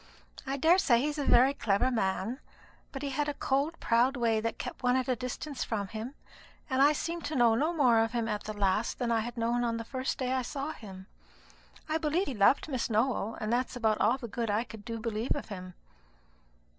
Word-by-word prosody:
I 270 +1 -1
daresay 320 -5 +4
he 295 - 0
is 300 0 -4
a 285 - -1
very 255 +3 +5
clever 235 0 +1
man; 220 +2 -1 0.5
but 270 0 -6
he 280 - -2
had 295 +2 -1
a 290 - -3
cold 280 +5 0
proud 245 +4 +2
way 230 -2 +2
that 230 +1 -3
kept - - -6
one 250 -1 +3
at 260 -1 0
a 255 - +1
distance 255 +3 -4
from 200 -3 -3
him, 225 +7 -6 0.6
and 260 +1 +2
I 285 +2 +7
seemed 335 +3 -3
to 305 - -3
know 240 -3 +5
no 300 +9 +1
more 255 -9 +4
of 225 0 +1
him 235 -2 -1
at 210 -2 -3
the 215 - -4
last 200 +3 +1
than 240 -2 -1
I 230 - +3
had 240 +2 -5
known 235 +1 +1
on 230 -1 0
the 230 - -5
first 260 +2 -3
day 255 -1 -1
I 260 - +1
saw 275 +4 -4
him. 190 -9 -10 0.8
I 315 +1 0
believe 320 +4 +1
he 275 - -4
loved 220 +8 +3
Miss 260 -6 -2
Nowell, 225 -1 0
and 215 +1 -1
that's 250 +1 0
about 220 -3 +1
all 250 - +3
the 250 -3 -7
good 230 +1 -3
I 210 +3 +1
do 230 0 -7
believe 225 +1 -1
of 285 - -6
him." 185 -3 -8
245 Hz, 225 wpm, -30 LUFS, 225-275 Hz, 0.8 s, I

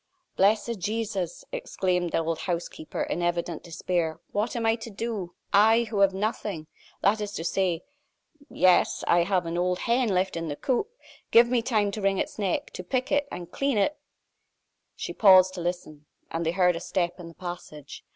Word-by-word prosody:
"Blessed 210 +3 +2
Jesus!" 200 -3 -3
exclaimed 185 - -1
the - - +1
old 165 0 -1
housekeeper, 170 -2 -3
in 175 - -3
evident 175 -1 -1
despair. 170 -1 -2
"What 210 +5 -1
am 230 -1 -1
I 225 - +4
to 225 0 -8
do? 210 -4 -4 0.2
I, 220 +3 +6
who 205 - -1
have 195 -1 +5
nothing! 195 -4 -3 0.4
That 210 +2 +3
is 205 -1 -4
to 165 - -4
say 175 -1 0 0.7
yes 185 -1 +3
I 175 - +4
have 185 -2 +1
an 165 +1 -2
old 180 0 +1
hen 240 0 +2
left 190 0 +1
in 165 0 -3
the 145 - -3
coop. 260 - -1 0.4
Give 235 +1 +7
me 245 -1 +2
time 215 -4 +1
to 210 - -5
wring 195 0 +2
its - - -3
neck, 195 -4 -1
to 185 - -7
pick 255 +8 -2
it, 285 0 +2
and 175 -1 -7
clean 275 -4 0
it 205 +9 +2 0.5
" - - -52
She - - -5
paused 185 -3 +6
to 180 - -5
listen, 165 -4 -5 0.2
and 165 0 -2
they 165 - +1
heard 180 -1 +3
a - - -3
step 175 0 -2
in 175 - -8
the 165 - -12
passage. 175 -5 -8
185 Hz, 190 wpm, -27 LUFS, 175-220 Hz, 0.7 s, Give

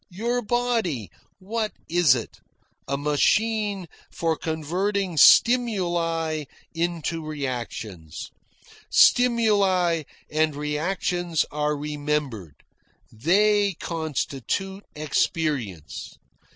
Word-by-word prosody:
Your 235 +7 -1
body 220 - -1 0.3
what 215 +3 -3
is 170 -6 +4
it? 120 - -6 0.5
A 140 - -1
machine 200 +7 +1 0.2
for 165 -1 -1
converting 175 +5 -2
stimuli 170 -9 +4 0.3
into 165 -1 -2
reactions. 120 - -5 0.6
Stimuli 200 -8 +4 0.3
and 155 -1 +1
reactions 165 +3 -1
are 150 0 -1
remembered. 145 - -3 0.5
They 200 - +3
constitute 165 - -3
experience. 145 - -2
165 Hz, 70 wpm, -25 LUFS, 150-200 Hz, 0.6 s, is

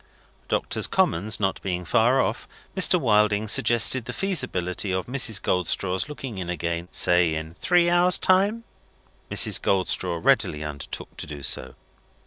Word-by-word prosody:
Doctors' - - 0
Commons 100 +7 0
not 95 -2 -1
being 90 -2 -4
far 120 +5 +2
off, - - -4 0.3
Mr. - - +3
Wilding 105 0 +2
suggested 120 +1 +3
the 125 - -6
feasibility 115 - -2
of 95 0 -2
Mrs. 120 -5 +1
Goldstraw's 90 - -1
looking 135 -8 -7
in 90 -1 -5
again, 85 0 -3
say 90 -2 +2
in 80 +1 -6
three 175 - +2
hours' 175 +1 +4
time. 200 +5 +1 0.7
Mrs. - - +2
Goldstraw 90 -2 -1
readily 75 -1 +1
undertook 75 -2 -8
to - - -6
do 75 -2 -9
so. - - -2
100 Hz, 140 wpm, -24 LUFS, 90-130 Hz, 0.7 s, hours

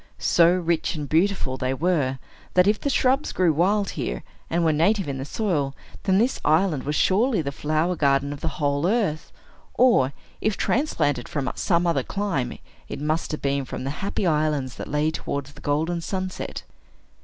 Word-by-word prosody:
So 170 0 +4
rich 170 -1 0
and 150 -2 -4
beautiful 165 -4 +1
they 130 +1 -1
were, 145 -4 +1 0.4
that, 180 0 +6
if 210 +1 +2
the 285 - 0
shrubs 265 +1 +2
grew 180 -3 +2
wild 195 +6 +2
here, 60 - -4 0.3
and 170 0 +1
were 160 - +3
native 190 +5 +2
in 135 -1 -3
the 135 - -4
soil, 145 -7 -1 0.3
then 190 -1 +3
this 240 +5 +1
island 160 -3 +2
was 150 +1 -1
surely 210 - +2
the 140 - -3
flower 155 +5 0
garden 140 -2 +2
of 145 - -10
the - - -1
whole 145 +2 +1
earth; 195 -8 0 0.4
or, 235 - +4 0.3
if 215 -2 0
transplanted 145 - 0
from 145 -6 -2
some 170 -2 +1
other 165 -5 +2
clime, 190 -6 -2 0.3
it - - -5
must 155 +3 -1
have 155 - -5
been 140 0 0
from 130 - -6
the 135 - -2
Happy 200 0 -2
Islands 150 -5 +1
that - - -6
lay 150 +2 +1
towards 140 -2 -4
the 145 - -14
golden 160 +4 0
sunset. 185 +1 -4
160 Hz, 180 wpm, -24 LUFS, 140-190 Hz, 0.4 s, that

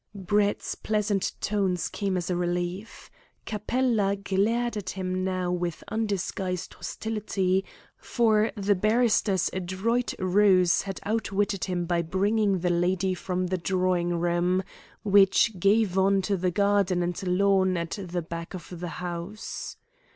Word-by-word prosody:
Brett's 205 +2 0
pleasant 210 -2 -1
tones 195 -4 0
came 195 -3 -2
as 175 0 -2
a - - +1
relief. 175 +4 -3 0.3
Capella 215 -1 0
glared 215 +5 0
at 200 -3 -4
him 185 0 -3
now 185 -1 -1
with 175 -2 -3
undisguised 195 -4 -2
hostility, 195 -4 -1 0.3
for 220 -2 +2
the 205 -1 +2
barrister's 215 -2 +2
adroit 190 +7 -1
ruse 185 -1 +4
had 195 -1 -6
outwitted 205 -2 -1
him 180 -2 -2
by 170 0 +1
bringing 200 +4 +1
the 180 0 +1
lady 180 +2 +1
from 185 0 -2
the 185 0 -2
drawing 180 -1 0
room, 175 +2 +1 0.4
which 200 0 +4
gave 200 0 +3
on 195 0 +3
to 200 +1 0
the 185 0 0
garden 200 -1 +2
and 175 0 -3
lawn 190 0 +3
at 170 +4 -4
the 175 -2 -4
back 170 +2 -6
of 175 -1 -9
the 175 0 -4 0.2
house. 175 +4 -6
190 Hz, 135 wpm, -27 LUFS, 180-205 Hz, 0.4 s, ruse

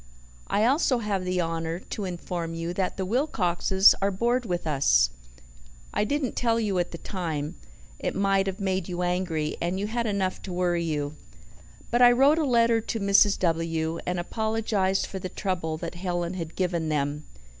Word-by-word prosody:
"I 210 - +2
also 265 0 +3
have 205 -5 -2
the 180 0 0
honour 165 0 -2
to 195 +2 -6
inform 175 -2 -4
you 165 +1 -3
that 185 0 -2
the 190 - -2
Wilcoxes 190 - +3
are 200 - +3
bored 235 +5 0
with 175 -2 -2
us. - - +3 0.8
I - - +1
didn't 285 +2 -1
tell 230 -1 +1
you 200 -5 0
at 175 - 0
the 170 - -7
time 165 -5 -4 0.5
it - - -2
might 195 0 +2
have 190 +1 -3
made 190 -2 -1
you 180 0 -2
angry, 175 -4 -1
and 175 +3 -1
you 200 - -1
had 230 +2 -1
enough 195 -3 -1
to 185 - -6
worry 175 -1 +1
you 150 -2 -2 0.7
but 240 +1 +2
I 245 0 +9
wrote 280 +6 +4
a 310 - +1
letter 230 -3 +3
to 225 - -3
Mrs. 200 0 +4
W., 165 -1 -1
and 180 0 -1
apologized 215 -1 0
for 190 - -6
the 185 - -5
trouble 175 -5 -2
that 165 +1 -5
Helen 175 -1 -2
had 165 -3 -6
given 170 -4 -1
them. 150 0 -1
185 Hz, 180 wpm, -26 LUFS, 170-210 Hz, 0.8 s, I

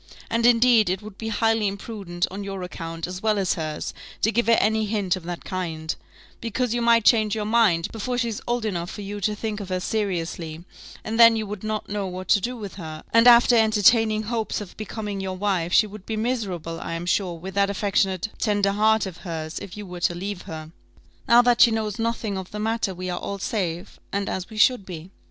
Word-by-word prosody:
And 230 +1 +3
indeed 235 -3 +5
it 190 +3 -2
would 210 -2 -11
be 225 - -4
highly 225 -1 +1
imprudent, 195 -3 -3
on 200 +2 -5
your 195 -2 -5
account, 165 -2 -5
as 180 +1 -6
well 215 -1 +2
as 190 -2 +1
hers, 155 -2 -4 0.3
to 220 - +4
give 235 0 +1
her 230 - +5
any 220 +1 +2
hint 200 -4 0
of 185 - -7
that 175 0 -6
kind: 160 -4 -3 0.4
because 235 +1 -1
you 240 - 0
might 230 -2 +4
change 215 -3 +4
your 215 -1 -2
mind, 210 -7 +3
before 245 +3 -3
she's 235 -3 -2
old 240 -1 0
enough 175 -4 -2
for 205 - -7
you 205 +1 -6
to 210 +2 0
think 215 0 -4
of 200 -3 -7
her 185 0 -1
seriously, 170 -5 -3 0.4
and 225 +1 -3
then 230 -1 +9
you 220 -1 -2
would 205 -1 -7
not 215 0 -3
know 205 -1 -3
what 185 0 -7
to 205 - +5
do 245 +5 -3
with 205 -5 -7
her; 155 -4 -7
and 230 +1 +6
after 240 0 +7
entertaining 220 0 +4
hopes 225 0 -2
of 205 -4 -9
becoming 210 -2 -5
your 190 -1 -4
wife, 185 -4 0
she 215 - +5
would 210 -1 -11
be 220 - -2
miserable, 195 -9 -2
I - - -5
am 165 +1 -4
sure, 175 0 0
with 185 +3 -8
that 200 0 +2
affectionate 195 -1 0
tender 205 -2 +2
heart 215 +2 +3
of 185 -3 -7
hers, 160 -2 -5
if 195 0 -9
you 210 - -6
were 180 -1 -8
to 175 0 +1
leave 195 +1 -4
her. 155 0 -7 0.6
Now 240 +1 +7
that 240 -1 +3
she - - +9
knows 220 0 -2
nothing 225 -3 -1
of 185 - -8
the 210 - -7
matter, 220 -2 -1
we 185 +1 -4
are 175 - -3
all 200 - -4
safe, 185 -5 -3
and 200 0 -1
as 185 -1 -3
we 220 - -10
should 245 0 +4
be." 180 -1 -9
205 Hz, 225 wpm, -24 LUFS, 180-225 Hz, 0.6 s, then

